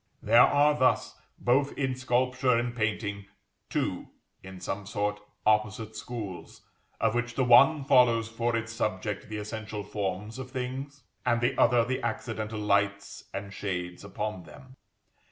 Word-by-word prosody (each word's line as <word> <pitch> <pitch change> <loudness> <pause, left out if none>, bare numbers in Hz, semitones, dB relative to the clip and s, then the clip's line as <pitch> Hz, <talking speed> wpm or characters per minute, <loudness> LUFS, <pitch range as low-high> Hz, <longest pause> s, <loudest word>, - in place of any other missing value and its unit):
There 115 +3 +6
are 145 +3 +5
thus, 130 -3 +2 0.2
both 135 +3 +1
in 130 -2 0
sculpture 125 0 +1
and 120 0 -2
painting, 105 -3 -2 0.4
two, 135 - -2 0.3
in 95 0 -10
some 95 +2 -5
sort, 105 0 -1 0.3
opposite 110 0 +1
schools, 105 -5 -7 0.4
of 110 -1 +2
which 120 0 -2
the 130 - +2
one 135 +5 +6
follows 120 -4 +4
for 115 +1 -1
its 115 0 -3
subject 105 -2 -3
the 110 - -4
essential 105 0 -5
forms 105 +2 -4
of 130 -1 -6
things, 130 +2 -5 0.2
and 120 -1 +2
the 120 +1 +1
other 120 -1 +4
the 130 +2 -2
accidental 110 -2 -3
lights 100 -1 0
and 100 0 -6
shades 90 -3 -4
upon 100 -1 -4
them. 130 - -14
115 Hz, 145 wpm, -28 LUFS, 105-125 Hz, 0.4 s, There